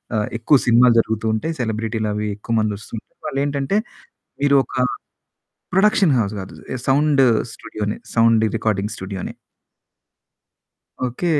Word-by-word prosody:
ఆహ్, 105 -1 0
ఎక్కువ 135 +5 +4
సినిమాలు 120 0 +6
జరుగుతూ 110 0 -1
ఉంటాయి. 160 +9 -2
సెలబ్రిటీలవి 110 -2 -2
ఎక్కువ 115 +2 -4
మంది 105 -1 0
వస్తు 110 - -13
ఉంటారు. - - -13
వాళ్ళేంటంటే 140 +6 -1 0.7
మీరు 140 -1 +5
ఒక - - -13 1.0
ప్రొడక్షన్ 195 -5 +4
హౌస్ 105 -1 -1
గాదు 95 - -9 0.3
సౌండ్ 140 0 +4 0.3
స్టూడియోనె. 105 0 -5 0.2
Sound 115 -1 +5
recording 105 -2 -1
స్టూడియోనె. 95 0 -6 1.7
ఓకే. 125 +9 -4
115 Hz, 115 wpm, -21 LUFS, 105-140 Hz, 1.7 s, సినిమాలు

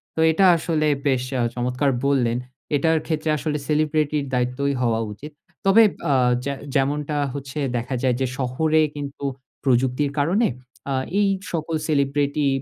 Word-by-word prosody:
তো - - -4
এটা 190 +5 +3
আসলে 160 -2 0 0.2
বেশ 130 -2 +2 0.2
আ - - +2
চমৎকার 125 +3 0 0.2
বললেন। 125 -4 +2 0.4
এটার 160 +3 +2
ক্ষেত্রে 155 -1 -2
আসলে 150 0 -2
celebrity 155 0 +1
র - - -5
দায়িত্বই 125 +3 0
হওয়া 115 -2 +1
উচিত। 150 +9 -10 0.3
তবে 200 +4 +7 0.3
আ - - +4 0.3
যে 140 - -1 0.2
যেমনটা 145 +2 0 0.2
হচ্ছে 140 +1 -6 0.2
দেখা 125 +3 -3
যায় 125 -2 +2
যে, - - +3
শহরে 155 +5 +1
কিন্তু 140 -1 -7 0.4
প্রযুক্তির 130 +2 +1
কারণে 185 +11 +2 0.4
আ - - +1 0.3
এই 205 - +4 0.2
সকল 165 -1 -2
celebrity 145 0 +1
145 Hz, 145 wpm, -23 LUFS, 130-155 Hz, 0.4 s, তবে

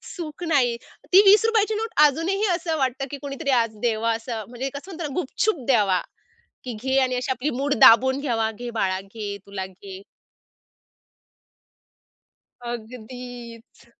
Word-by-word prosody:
सुख 335 -1 -7
नाही. 260 -7 +2 0.4
ती 390 - +10
₹20 440 +1 +5
ची 435 - -1
नोट 445 +1 -2 0.2
अजूनही 345 +9 +1
असं 330 -3 -2
वाटतं, 265 0 -1
की 285 - -5
कोणीतरी 280 +1 -5
आज 230 -1 -4
द्यावा 230 -1 +1
असं 225 -1 -5
म्हणजे 255 +2 -4
कसं 320 +8 -8
म्हणता 335 -1 -6
ना, 275 - -8
गुपचुप 360 +5 -1
द्यावा, 205 -8 +3 0.6
की 250 -2 -5
"घे." 265 +1 0
आणि 255 -1 0
अशी 255 +2 -2
आपली 260 +4 -1
मूठ 285 +1 +1
दाबून 260 +4 +7
घ्यावा, 225 -5 0
"घे 240 +2 -7
बाळा, 190 -4 -1
घे 200 0 -7
तुला 195 -1 -5
घे." 190 0 -11 2.7
अगदीच. 240 0 -9
250 Hz, 145 wpm, -23 LUFS, 225-290 Hz, 2.7 s, ती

